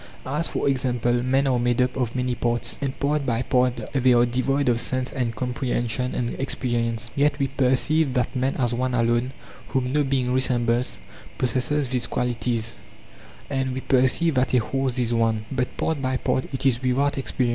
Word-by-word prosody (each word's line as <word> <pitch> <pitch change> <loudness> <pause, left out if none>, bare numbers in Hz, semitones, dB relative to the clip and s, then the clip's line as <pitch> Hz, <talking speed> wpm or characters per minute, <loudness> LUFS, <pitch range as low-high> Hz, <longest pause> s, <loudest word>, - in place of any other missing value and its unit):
As 150 +6 0
for - - -2
example, 125 -3 +1
men 135 +2 +2
are 130 -2 +2
made 120 0 +1
up 125 0 +1
of 125 -2 -2
many 125 -1 0
parts, 120 0 0
and 135 -1 -3
part 145 +1 0
by 120 -2 0
part 125 -1 +1
they 130 -2 +4
are 120 0 +5
devoid 130 +3 0
of 120 -2 +3
sense 130 +1 0
and 120 -4 -2
comprehension 125 0 -2
and 120 -1 -1
experience, 115 -4 -1
yet 145 +1 +2
we 140 -2 0
perceive 135 +2 +2
that 125 +2 0
man 130 +1 0
as 120 -3 0
one 125 +1 -1
alone, 120 +2 +1 0.4
whom 130 0 -1
no 150 0 +3
being 130 -2 0
resembles, 120 -1 +2 0.4
possesses 130 +3 +1
these 125 -2 0
qualities; 120 -2 -1 0.7
and 130 -1 -2
we 130 - -3
perceive 130 +6 +2
that 130 0 +1
a - - +6
horse 130 +2 -1
is 120 -1 0
one, 115 -2 +1
but 125 -2 -2
part 160 -3 -1
by 130 -1 0
part 130 - -1
it 135 0 -4
is 125 -2 +2
without 130 +3 +1
experience. 130 -2 -1
125 Hz, 185 wpm, -24 LUFS, 120-135 Hz, 0.7 s, a